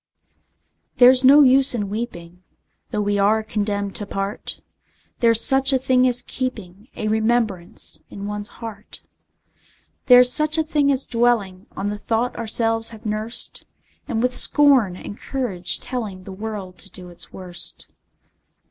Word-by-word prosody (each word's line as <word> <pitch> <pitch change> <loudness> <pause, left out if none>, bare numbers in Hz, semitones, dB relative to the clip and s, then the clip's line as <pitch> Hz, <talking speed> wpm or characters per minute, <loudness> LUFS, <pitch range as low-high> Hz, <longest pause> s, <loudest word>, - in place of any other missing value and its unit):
There's 255 +1 +6
no 285 +3 +8
use 265 0 +4
in 205 -3 -2
weeping, 180 -5 -7 0.5
Though 210 - -2
we 205 0 0
are 215 +2 +2
condemned 205 -2 -3
to 205 - -6
part: 195 +1 -5 0.6
There's 230 -2 +4
such 270 +1 +3
a 265 - +3
thing 255 0 +2
as 245 -1 +2
keeping 215 -5 -6
A 215 - -4
remembrance 220 -4 0
in 200 - -8
one's 210 +1 -5 0.2
heart: 210 -2 -10 1.0
There's 250 -1 +7
such 305 +3 +3
a 320 - +2
thing 295 -2 +1
as 270 -1 +1
dwelling 225 -6 0
On 200 - -2
the 210 - -6
thought 230 +3 -1
ourselves 225 0 0
have 220 -1 -13
nursed, 215 +2 -4 0.4
And 235 -5 -2
with 250 0 0
scorn 270 - +4
and 205 +3 -9
courage 190 -10 -1
telling 215 -8 -5
The 195 - -10
world 200 -2 -7
to 195 - -8
do 180 -2 -10
its 175 - -8
worst. 180 -2 -6
220 Hz, 150 wpm, -21 LUFS, 200-250 Hz, 1.0 s, no